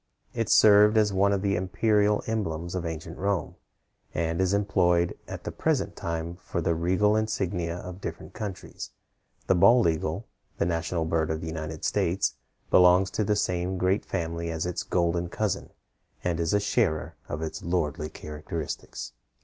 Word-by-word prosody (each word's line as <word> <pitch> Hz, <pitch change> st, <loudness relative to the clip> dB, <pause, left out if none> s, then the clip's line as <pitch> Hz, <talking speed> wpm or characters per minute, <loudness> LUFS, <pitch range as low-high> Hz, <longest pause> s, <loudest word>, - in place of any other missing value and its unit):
It 115 Hz, -3 st, -1 dB
served 105 Hz, +1 st, +7 dB
as 105 Hz, -2 st, +3 dB
one 100 Hz, +1 st, +3 dB
of 100 Hz, -1 st, 0 dB
the 100 Hz, 0 st, +2 dB
imperial 105 Hz, +3 st, +2 dB
emblems 85 Hz, -7 st, -2 dB
of 90 Hz, -2 st, -2 dB
ancient 80 Hz, +1 st, -6 dB
Rome, 100 Hz, -4 st, -1 dB, 0.6 s
and 80 Hz, +2 st, 0 dB
is 95 Hz, -1 st, +2 dB
employed 90 Hz, -4 st, +2 dB
at -, -, -7 dB
the -, -, -4 dB
present -, -, 0 dB
time 85 Hz, +1 st, -4 dB
for 90 Hz, -, -4 dB
the 85 Hz, 0 st, +1 dB
regal 95 Hz, +6 st, +2 dB
insignia 90 Hz, -6 st, -1 dB
of 90 Hz, +1 st, -8 dB
different -, -, -6 dB
countries. 100 Hz, -4 st, -6 dB, 0.6 s
The -, -, +4 dB
bald 100 Hz, +3 st, +6 dB
eagle, 80 Hz, +5 st, -1 dB, 0.3 s
the -, -, +1 dB
national 85 Hz, 0 st, -1 dB
bird 80 Hz, -1 st, 0 dB
of 80 Hz, 0 st, -1 dB
the -, -, -5 dB
United 80 Hz, -1 st, -5 dB
States, 95 Hz, +4 st, +1 dB, 0.4 s
belongs 90 Hz, +1 st, +6 dB
to 110 Hz, -, 0 dB
the 105 Hz, +1 st, +1 dB
same 90 Hz, -2 st, -1 dB
great 95 Hz, +3 st, +1 dB
family 85 Hz, -2 st, -3 dB
as 80 Hz, 0 st, -2 dB
its 90 Hz, -1 st, -2 dB
golden 85 Hz, 0 st, 0 dB
cousin, 105 Hz, +1 st, -2 dB, 0.5 s
and 85 Hz, -2 st, 0 dB
is 80 Hz, -1 st, 0 dB
a -, -, +4 dB
sharer 100 Hz, -, 0 dB, 0.2 s
of 75 Hz, +2 st, -3 dB
its 80 Hz, -, -5 dB
lordly 80 Hz, -3 st, -1 dB
characteristics. 75 Hz, 0 st, -6 dB
90 Hz, 165 wpm, -27 LUFS, 80-100 Hz, 0.6 s, served